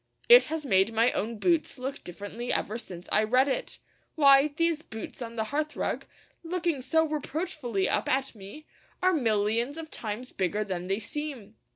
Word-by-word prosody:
It 485 +1 +9
has 315 -1 -4
made 195 -3 +3
my 230 +2 +4
own 225 +2 -3
boots 330 - +1
look 265 +2 -5
differently 205 +7 -6
ever 220 +3 -1
since 180 -5 -9
I - - +4
read 255 +5 +3
it. 270 - -2 0.4
Why, 280 -2 +7
these 320 +1 0
boots 225 -3 -8
on 230 -1 -6
the 220 - 0
hearthrug, 305 +1 -2 0.4
looking 335 -4 -1
so 320 +5 +2
reproachfully 295 - -2
up - - 0
at 265 +1 0
me, 210 +9 -11 0.4
are 370 0 +4
millions 230 0 +1
of 320 -1 -7
times 225 +3 -5
bigger 200 +3 -1
than 180 -3 -4
they 195 +1 0
seem! 245 -2 -6
255 Hz, 170 wpm, -28 LUFS, 215-305 Hz, 0.4 s, It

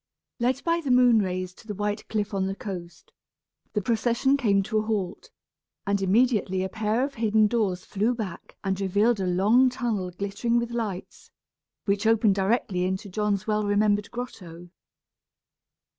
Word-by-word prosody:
Led 255 +3 0
by 335 0 +1
the 285 - -4
moon 250 -3 +5
rays 185 -1 -3
to 220 - -18
the 210 - -4
white 210 +2 -3
cliff 210 -1 -2
on 190 -1 0
the 195 - -3
coast, 180 -4 -8 0.6
the 210 - -1
procession 240 +4 +2
came 205 -8 +2
to 215 +2 0
a - - +1
halt; 215 - -3 0.6
and 200 0 0
immediately 195 -2 +2
a 190 - -3
pair 220 +4 0
of 280 - -7
hidden 220 -2 +3
doors 205 -5 0
flew 220 +5 0
back 205 -7 -7
and 195 0 -1
revealed 205 +4 +2
a 190 - -1
long 210 +9 +4
tunnel 225 -7 -2
glittering 200 +6 -1
with 235 0 -1
lights, 215 -6 -5 0.6
which 205 +2 +1
opened 220 -2 +4
directly 195 -2 0
into 190 +2 -2
John's 210 0 -1
well 215 -1 0
remembered 205 0 +1
grotto. 180 -8 -8
210 Hz, 160 wpm, -26 LUFS, 190-235 Hz, 0.6 s, moon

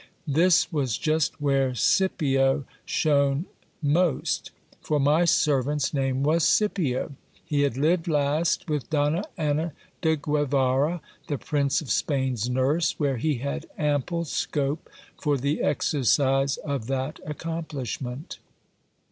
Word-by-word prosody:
This 165 +4 +3
was 130 -8 0
just 155 -1 0
where 135 -3 +1
Scipio 135 -4 +2 0.2
shone 140 0 +2 0.4
most; 160 +2 +1 0.3
for 150 - 0
my 150 +5 +3
servant's 145 -2 +2
name 135 -1 0
was 160 +3 +2
Scipio. 170 - +1 0.3
He 150 -3 0
had 140 -4 0
lived 165 +4 +1
last 150 +3 +1
with 150 -4 -2
Donna 150 +4 +1
Anna 155 0 0 0.3
de 160 -1 +3
Guevara, 145 +1 +1 0.3
the 145 - -1
Prince 140 0 0
of 145 - -9
Spam's 130 -5 0
nurse, 135 +6 +1
where 140 -4 +1
he 150 +5 0
had 140 +6 -4
ample 150 +3 0
scope 145 0 -2 0.3
for 145 -2 +1
the 140 +3 -1
exercise 135 -1 +2
of 140 -6 -4
that 135 +2 -2
accomplishment. 150 -3 -5
145 Hz, 120 wpm, -26 LUFS, 135-155 Hz, 0.4 s, This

